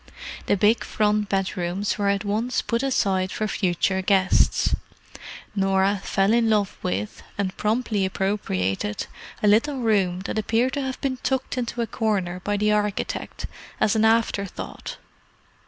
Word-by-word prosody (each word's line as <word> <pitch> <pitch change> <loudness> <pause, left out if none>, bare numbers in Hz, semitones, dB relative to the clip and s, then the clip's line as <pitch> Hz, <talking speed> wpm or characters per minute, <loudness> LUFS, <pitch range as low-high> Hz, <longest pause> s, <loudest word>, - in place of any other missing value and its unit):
The 205 - +3
big 210 +4 +3
front 210 -1 +1
bedrooms 190 +1 -1
were 200 - +1
at 200 +1 0
once 220 +5 0
put 235 0 0
aside 195 -8 +1
for 215 - -2
future 190 -1 0
guests. 190 0 +3 0.8
Norah 195 0 +2
fell 195 +2 +2
in 230 -1 +3
love 210 -3 +1
with, 100 +3 -3 0.2
and 195 -2 -1
promptly 215 -2 0
appropriated, 105 - -1 0.4
a - - +4
little 235 +8 +3
room 195 -6 +1
that 200 - -2
appeared 230 +5 +1
to 285 - -1
have 265 -1 -4
been 265 -2 -1
tucked 265 0 -1
into 240 -1 -2
a - - -1
corner 200 -5 -1
by 205 +2 -1
the 210 +1 +2
architect, 210 -1 -2 0.3
as 210 - +3
an 220 - +3
afterthought. 220 -3 0
205 Hz, 145 wpm, -24 LUFS, 190-225 Hz, 0.8 s, a